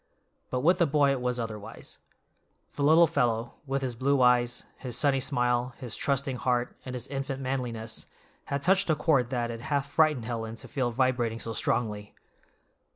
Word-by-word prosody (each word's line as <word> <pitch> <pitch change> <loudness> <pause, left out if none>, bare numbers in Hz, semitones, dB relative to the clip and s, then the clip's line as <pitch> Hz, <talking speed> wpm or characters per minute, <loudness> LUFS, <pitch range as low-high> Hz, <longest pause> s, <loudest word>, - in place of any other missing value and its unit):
But 125 - -1
with 175 +6 +4
the 170 - +4
boy 140 -1 +3
it 135 -2 -1
was 125 0 -1
otherwise. 110 -3 -7 0.7
The - - -5
little 160 +4 +6
fellow, 120 -7 0
with 135 0 -1
his 125 -2 -2
blue 135 +4 +1
eyes, 120 0 +3 0.2
his 125 -3 -3
sunny 140 -2 +3
smile, 125 -2 0
his 120 -3 -3
trusting 135 -2 0
heart, 125 -1 0
and 130 -1 -6
his 125 +1 -5
infant 135 -1 -3
manliness, 120 -4 -3 0.4
had 140 0 -3
touched 190 0 +3
a 155 - +4
chord 140 -5 +2
that 120 -2 -1
it 115 0 -7
half 140 +1 -1
frightened 155 -7 +3
Helen 115 -1 -4
to - - -11
feel 130 -3 -1
vibrating 120 -2 0
so 115 - -3
strongly. 105 -3 -1
125 Hz, 175 wpm, -28 LUFS, 120-140 Hz, 0.7 s, little